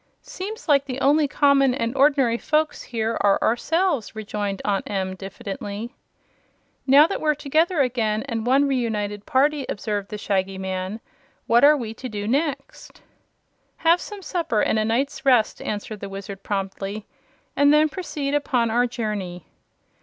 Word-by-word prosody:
"Seems 415 Hz, +4 st, -7 dB
like 280 Hz, -2 st, +4 dB
the 260 Hz, -1 st, -5 dB
only 290 Hz, +2 st, +3 dB
common 275 Hz, -2 st, +3 dB
and 235 Hz, -1 st, -2 dB
ordinary 270 Hz, -4 st, +3 dB
folks 310 Hz, 0 st, 0 dB
here 225 Hz, -1 st, -2 dB
are 200 Hz, -1 st, +4 dB
ourselves," 300 Hz, -, 0 dB
rejoined 205 Hz, -2 st, -3 dB
Aunt 200 Hz, -2 st, -1 dB
Em, 190 Hz, -2 st, -2 dB
diffidently. 200 Hz, +4 st, -7 dB, 0.9 s
"Now 280 Hz, +3 st, +8 dB
that 395 Hz, -, -3 dB
we're 305 Hz, -1 st, +2 dB
together 310 Hz, +3 st, +1 dB
again, 225 Hz, -4 st, 0 dB
and 230 Hz, -5 st, -3 dB
one 275 Hz, +3 st, +4 dB
reunited 210 Hz, -6 st, -2 dB
party," 285 Hz, +2 st, +2 dB
observed 205 Hz, -1 st, -3 dB
the 210 Hz, -, -5 dB
Shaggy 195 Hz, -2 st, -1 dB
Man, 190 Hz, +3 st, -4 dB, 0.4 s
"what 235 Hz, +2 st, +4 dB
are 295 Hz, +1 st, +7 dB
we 225 Hz, -4 st, -5 dB
to 255 Hz, +3 st, -7 dB
do 205 Hz, -2 st, -4 dB
next?" 280 Hz, +2 st, -3 dB, 0.7 s
"Have 335 Hz, +2 st, +3 dB
some 410 Hz, -2 st, -8 dB
supper 335 Hz, -, -1 dB
and 220 Hz, -, +1 dB
a 215 Hz, -, +1 dB
night's 265 Hz, +4 st, -1 dB
rest," 250 Hz, -5 st, +3 dB
answered 210 Hz, 0 st, -5 dB
the 200 Hz, -, -6 dB
Wizard 195 Hz, 0 st, -8 dB
promptly, 195 Hz, +1 st, -4 dB, 0.5 s
"and 285 Hz, 0 st, +5 dB
then 305 Hz, +1 st, +5 dB
proceed 295 Hz, -4 st, -4 dB
upon 255 Hz, -6 st, +1 dB
our 245 Hz, +2 st, +2 dB
journey." 205 Hz, -7 st, -4 dB
235 Hz, 155 wpm, -23 LUFS, 205-285 Hz, 0.9 s, Now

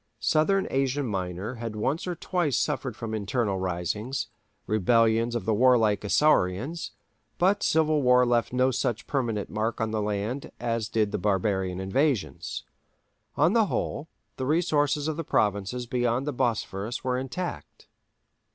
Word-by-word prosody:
Southern 190 Hz, +6 st, +2 dB
Asia 135 Hz, +1 st, 0 dB
Minor 95 Hz, -1 st, -3 dB
had 115 Hz, -2 st, -4 dB
once 140 Hz, +11 st, -1 dB
or 180 Hz, -, -2 dB
twice 170 Hz, -5 st, 0 dB
suffered 125 Hz, -5 st, -1 dB
from 110 Hz, -1 st, -5 dB
internal 105 Hz, -1 st, -1 dB
risings—rebellions 110 Hz, +4 st, 0 dB
of 115 Hz, -5 st, -2 dB
the 110 Hz, -, +2 dB
warlike 115 Hz, -3 st, +4 dB
Isaurians—but 150 Hz, -, 0 dB
civil 155 Hz, -1 st, +2 dB
war 125 Hz, -1 st, +5 dB
left 120 Hz, -2 st, +1 dB
no 130 Hz, +1 st, +2 dB
such 120 Hz, -2 st, -1 dB
permanent 115 Hz, -7 st, -2 dB
mark 110 Hz, +2 st, -2 dB
on 110 Hz, -1 st, -1 dB
the 110 Hz, -1 st, -1 dB
land 105 Hz, +6 st, -3 dB
as 115 Hz, -2 st, -2 dB
did 110 Hz, -2 st, +1 dB
barbarian 95 Hz, -2 st, 0 dB
invasions. 95 Hz, -, -1 dB, 0.7 s
On 175 Hz, -, +3 dB
the 225 Hz, -3 st, +4 dB
whole, 160 Hz, -3 st, -3 dB, 0.3 s
the 130 Hz, -, -2 dB
resources 150 Hz, -2 st, +1 dB
of 155 Hz, -1 st, -2 dB
the 165 Hz, -, -2 dB
provinces 105 Hz, 0 st, 0 dB
beyond 120 Hz, +1 st, 0 dB
the 150 Hz, -, -2 dB
Bosphorus 115 Hz, -3 st, -2 dB
were 125 Hz, -1 st, 0 dB
intact. 150 Hz, +6 st, -6 dB
120 Hz, 135 wpm, -27 LUFS, 105-140 Hz, 0.7 s, war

